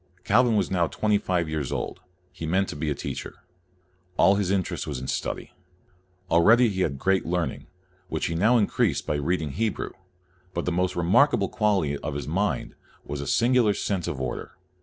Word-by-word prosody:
Calvin 125 +1 +4
was 100 -4 +1
now 85 -3 +2
twenty 105 +3 +1
five 90 -4 0
years 75 -4 -3
old. - - -3 0.3
He 80 - -6
meant 95 +4 +1
to - - -5
be 75 +1 -2
a 75 - -1
teacher. - - -6 0.8
All 95 +3 +6
his 100 -2 0
interest 95 -2 -1
was 70 -4 -3
in 65 - -6
study. - - -3 0.8
Already 115 +9 +6
he 95 -2 -2
had 70 -6 0
great 95 +7 +1
learning, 85 -5 -2 0.4
which 80 -3 -2
he 85 - -1
now 110 +9 +4
increased 105 - +1
by - - -1
read 85 +5 0
CALVIN 75 - -3
103 105 +11 -2
ing 110 - +3
Hebrew, - - -5 0.6
but 85 - -2
the 90 - 0
most 90 +1 0
remarkable 100 - +3
quality 95 -10 +1
of - - -4
his 70 - -4
mind 95 +6 -1 0.3
was 70 0 -4
a 70 - -6
singular 120 -3 +3
sense 95 -4 -2
of 70 - -3
order. 65 -2 -4
90 Hz, 195 wpm, -26 LUFS, 80-105 Hz, 0.8 s, All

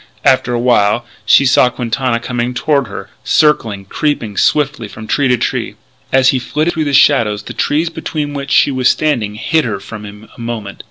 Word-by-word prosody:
After 130 -2 +3
a - - -1
while 120 -2 +2 0.2
she 140 - +6
saw 130 -1 +4
Quintana 125 0 -2
coming 120 +1 -3
toward 140 -1 +1
her, 100 - -8
circling, 115 -10 +1
creeping 115 -2 -2
swiftly 140 -4 +1
from 110 +1 -10
tree 140 +5 +1
to 125 -1 +2
tree. - - -2 0.4
As 130 0 +4
he 130 - +1
flitted 155 +6 -1
through 160 -1 -1
the 145 - -1
shadows 110 -8 +3
the - - -8
trees 160 +3 0
between 150 -3 -4
which 140 -1 -5
she 140 - +4
was 130 -1 +2
standing 120 -9 0
hid 160 +8 0
her 110 -5 -3
from 105 +2 -9
him 105 +1 -11
a - - -11
moment. 115 -4 -6
125 Hz, 195 wpm, -15 LUFS, 110-145 Hz, 0.4 s, she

